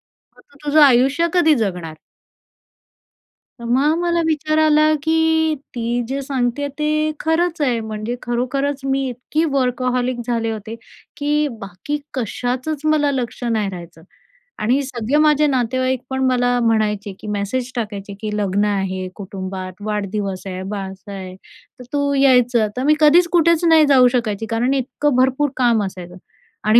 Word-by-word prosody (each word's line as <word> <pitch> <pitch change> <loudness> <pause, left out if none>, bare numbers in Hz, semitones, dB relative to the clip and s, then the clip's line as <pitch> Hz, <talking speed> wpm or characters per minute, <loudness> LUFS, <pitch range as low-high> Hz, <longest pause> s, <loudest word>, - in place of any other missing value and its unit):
मग - - -26
तू - - -19
तुझं 300 +1 +5
आयुष्य 275 +5 +4
कधी 330 -4 +4
जगणार?" 180 - -3 1.6
तर 235 - -8
मग 275 +7 +2
मला 340 -1 +1
विचार 310 0 0
आला, 310 0 +4
की 320 -1 +2 0.2
ती 240 +1 -1
जे 275 +2 -3
सांगते 265 0 -1
ते 305 +1 +1
खरंच 325 +1 0
आहे. 250 -5 +1
म्हणजे 220 +2 -4
खरोखरच 265 +4 -1
मी 270 0 0
इतकी 250 +6 -2
वर्कहॉलिक 250 -1 0
झाले 230 -2 -1
होते, 220 +1 -6 0.4
की 295 +1 +1
बाकी 195 +9 -5 0.2
कशाचंच 255 +4 -3
मला 305 -2 +2
लक्ष 250 -2 -4
नाही 220 -4 0
राहायचं. 170 -3 -10 0.6
आणि 250 +6 +2
सगळे 260 0 -1
माझे 300 -1 +4
नातेवाईक 255 0 0
पण 265 0 -1
मला 245 -1 +2
म्हणायचे 210 -3 0
की - - -10
मेसेज 210 +5 -2
टाकायचे, 205 -4 -5
की 210 -1 -3
लग्न 205 0 +1
आहे 190 -2 -2
कुटुंबात, 190 -2 -6
वाढदिवस 205 -2 -3
आहे, 185 -1 -5
बारसं 195 0 -7
आहे, 190 -2 -7 0.4
तर - - -9
तू 285 0 +1
यायचं. 250 -4 +4
तर 255 - -1
मी 300 +2 +4
कधीच 325 +3 +6
कुठेच 335 -1 +3
नाही 320 -2 +6
जाऊ 255 -3 +6
शकायची, 225 -3 -1
कारण 235 +3 +1
इतकं 270 +1 -1
भरपूर 265 +3 +2
काम 235 -4 +3
असायचं. 180 -2 -8 0.5
आणि 215 +2 +6
250 Hz, 150 wpm, -19 LUFS, 215-290 Hz, 1.6 s, कधीच